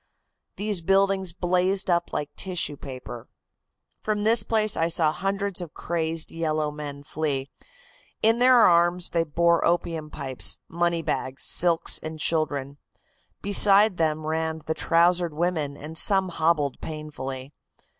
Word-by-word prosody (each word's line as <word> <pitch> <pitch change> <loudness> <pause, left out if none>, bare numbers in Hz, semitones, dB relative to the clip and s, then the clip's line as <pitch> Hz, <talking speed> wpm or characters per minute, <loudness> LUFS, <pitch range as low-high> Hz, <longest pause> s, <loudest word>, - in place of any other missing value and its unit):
These 205 -3 -2
buildings 195 0 +1
blazed 185 +3 0
up 175 -1 0
like 145 - -4
tissue 180 -6 -3
paper. 130 -4 -9 0.7
"From 210 -1 -2
this 220 +1 +5
place 215 0 +1
I 165 - +1
saw 160 -2 +3
hundreds 195 +1 -2
of 170 -3 -9
crazed 165 -1 -2
yellow 155 -2 -2
men 145 -1 -8
flee. 145 -2 -3 0.7
In 225 +2 +3
their 255 +1 +6
arms 175 -1 +3
they 165 -1 +1
bore 170 +2 +1
opium 165 -2 -1
pipes, 135 -3 0
money 170 0 -1
bags, 135 -3 -3
silks 170 -2 +2
and 155 0 -7
children. 145 -3 -2 0.6
Beside 200 0 +4
them 155 -1 -1
ran 160 0 -2
the 160 - -1
trousered 170 0 +1
women 155 -4 -2
and 155 +3 -9
some 190 +2 +3
hobbled 160 -5 0
painfully. 140 -3 -7
165 Hz, 135 wpm, -25 LUFS, 150-180 Hz, 0.7 s, their